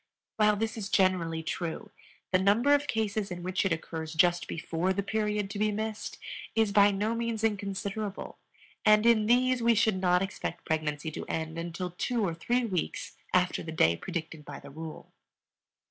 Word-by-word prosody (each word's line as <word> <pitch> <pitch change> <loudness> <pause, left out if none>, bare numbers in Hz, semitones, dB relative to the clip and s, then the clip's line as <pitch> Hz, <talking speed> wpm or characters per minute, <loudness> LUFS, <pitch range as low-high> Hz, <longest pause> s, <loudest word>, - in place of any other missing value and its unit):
While 210 -1 +4
this 220 +2 -2
is 200 -3 -4
generally 170 -4 +2
true, 175 +6 -4 0.4
the 185 - +4
number 215 +9 +4
of 290 0 +2
cases 215 -2 -1
in 175 -1 -6
which 185 +1 0
it 195 - 0
occurs 160 -1 -4
just 175 +2 +3
before 170 +3 -1
the 200 +1 -1
period 210 0 -1
to 205 - -5
be 215 0 +2
missed 215 +1 -4 0.4
is 220 -2 +3
by 205 0 +6
no 205 +3 0
means 230 -1 -2
inconsiderable, 200 -1 -3 0.4
and 215 +1 +5
in 225 -2 +5
these 250 +1 +3
we 230 0 +4
should 210 -3 +2
not 180 0 +3
expect 190 -2 -5
pregnancy 155 0 -1
to - - -6
end 160 0 -3
until 170 +1 -4
two 225 +5 -1
or 170 - -2
three 240 +9 0
weeks 185 -6 -3 0.2
after 180 0 +2
the 160 - -6
day 85 - +3
predicted 160 - -5
by 145 -1 -8
the - - -12
rule. 160 +2 -8
195 Hz, 175 wpm, -29 LUFS, 170-220 Hz, 0.4 s, by